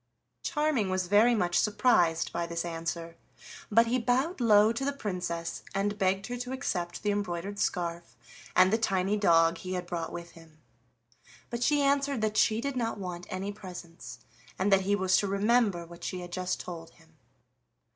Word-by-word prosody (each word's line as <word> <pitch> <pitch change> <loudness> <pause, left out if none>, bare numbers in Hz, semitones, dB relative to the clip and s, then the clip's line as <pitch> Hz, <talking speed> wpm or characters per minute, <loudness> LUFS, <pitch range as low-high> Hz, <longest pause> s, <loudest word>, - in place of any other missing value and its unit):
Charming 300 - 0
was 185 0 0
very 210 +6 +5
much 175 -5 +1
surprised 205 -7 +2
by 170 0 -2
this 170 0 -3
answer, 165 0 -5 0.5
but 230 +2 +5
he 245 +2 +1
bowed 255 +7 0
low 215 -1 +5
to 235 - -3
the 280 - +1
Princess, 180 -8 -4
and 205 +1 -1
begged 190 0 +1
her 245 +3 -4
to 250 +1 -5
accept 180 -10 -3
the 210 - +1
embroidered 200 0 -3
scarf 170 -2 -2 0.4
and 185 +2 +5
the 225 - +3
tiny 195 -2 +1
dog 165 -4 +4
he 185 0 -5
had 180 -1 -3
brought 170 -2 -4
with 170 0 -7
him. 165 -2 -17 0.9
But 235 0 -3
she 290 +3 +3
answered 280 -2 +1
that 215 -1 0
she 220 +1 +3
did 280 +1 -3
not 230 -3 -1
want 180 -2 -6
any 190 +2 -3
presents, 180 -4 -10 0.4
and 195 +2 +2
that 195 - +5
he 200 +2 +1
was 190 -2 +2
to 200 - +1
remember 200 -2 +2
what 170 0 -13
she 185 -1 -4
had 175 0 -9
just 185 0 -2
told 165 -2 -7
him. 160 -1 -24
195 Hz, 180 wpm, -29 LUFS, 175-225 Hz, 0.9 s, very